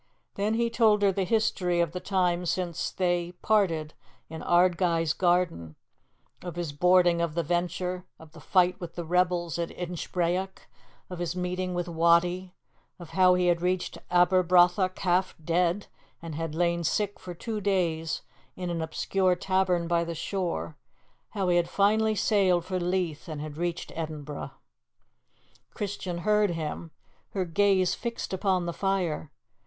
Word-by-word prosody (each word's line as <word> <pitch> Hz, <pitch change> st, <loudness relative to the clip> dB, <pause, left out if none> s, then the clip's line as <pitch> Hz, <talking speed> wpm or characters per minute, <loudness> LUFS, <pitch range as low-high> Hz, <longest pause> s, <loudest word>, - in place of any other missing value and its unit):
Then 210 Hz, +2 st, 0 dB
he 235 Hz, 0 st, 0 dB
told 220 Hz, -3 st, +3 dB
her 200 Hz, -, +5 dB
the 195 Hz, 0 st, -1 dB
history 190 Hz, -4 st, +1 dB
of 170 Hz, -3 st, +1 dB
the 180 Hz, -, -4 dB
time 180 Hz, -2 st, 0 dB
since 175 Hz, -2 st, -1 dB
they 175 Hz, -1 st, -1 dB
parted 170 Hz, -8 st, +1 dB, 0.4 s
in 160 Hz, -, -6 dB
Ardguys 175 Hz, -2 st, +2 dB
garden; 175 Hz, -, +1 dB, 0.7 s
of 175 Hz, -2 st, -7 dB
his 170 Hz, -4 st, -4 dB
boarding 175 Hz, +2 st, +4 dB
of 165 Hz, -2 st, -2 dB
the 170 Hz, -, 0 dB
Venture; 180 Hz, +2 st, -2 dB
of 160 Hz, -1 st, -15 dB
the 160 Hz, -, -13 dB
fight 180 Hz, +3 st, +2 dB
with 170 Hz, -2 st, -7 dB
the 175 Hz, -, -4 dB
rebels 175 Hz, -1 st, +1 dB
at 170 Hz, -, -1 dB
Inchbrayock; 180 Hz, +1 st, -3 dB, 0.4 s
of 180 Hz, -, -6 dB
his 175 Hz, 0 st, -2 dB
meeting 180 Hz, 0 st, -2 dB
with 175 Hz, 0 st, -2 dB
Wattie; 170 Hz, +2 st, +2 dB, 0.4 s
of 170 Hz, -3 st, -11 dB
how 185 Hz, +1 st, +5 dB
he 180 Hz, 0 st, +1 dB
had 175 Hz, -1 st, +2 dB
reached 180 Hz, 0 st, -1 dB
Aberbrothock 180 Hz, +1 st, +4 dB
half 185 Hz, 0 st, +1 dB
dead, 175 Hz, +4 st, +1 dB, 0.3 s
and 165 Hz, -1 st, -7 dB
had 160 Hz, 0 st, -4 dB
lain 170 Hz, 0 st, +1 dB
sick 205 Hz, +5 st, -1 dB
for 180 Hz, -1 st, -8 dB
two 215 Hz, +3 st, -4 dB
days 170 Hz, -5 st, 0 dB, 0.3 s
in 180 Hz, -1 st, -4 dB
an 165 Hz, -1 st, -2 dB
obscure 185 Hz, +3 st, +1 dB
tavern 185 Hz, -2 st, +1 dB
by 170 Hz, 0 st, +2 dB
the 170 Hz, 0 st, -5 dB
shore; 170 Hz, -3 st, -3 dB, 0.5 s
how 195 Hz, -3 st, -2 dB
he 175 Hz, -1 st, +3 dB
had 170 Hz, -1 st, +1 dB
finally 215 Hz, +2 st, +2 dB
sailed 190 Hz, -5 st, +2 dB
for 185 Hz, 0 st, -2 dB
Leith 175 Hz, -3 st, -2 dB
and 155 Hz, -2 st, -5 dB
had 150 Hz, 0 st, -6 dB
reached 175 Hz, +1 st, -3 dB
Edinburgh. 155 Hz, -3 st, -5 dB, 1.3 s
Christian 195 Hz, -4 st, -4 dB
heard 210 Hz, -1 st, +3 dB
him, 165 Hz, 0 st, -4 dB, 0.4 s
her 190 Hz, -2 st, -1 dB
gaze 185 Hz, +1 st, +2 dB
fixed 235 Hz, -4 st, -5 dB
upon 190 Hz, -2 st, +1 dB
the 170 Hz, -, -3 dB
fire. 180 Hz, -6 st, -1 dB
180 Hz, 155 wpm, -27 LUFS, 170-185 Hz, 1.3 s, her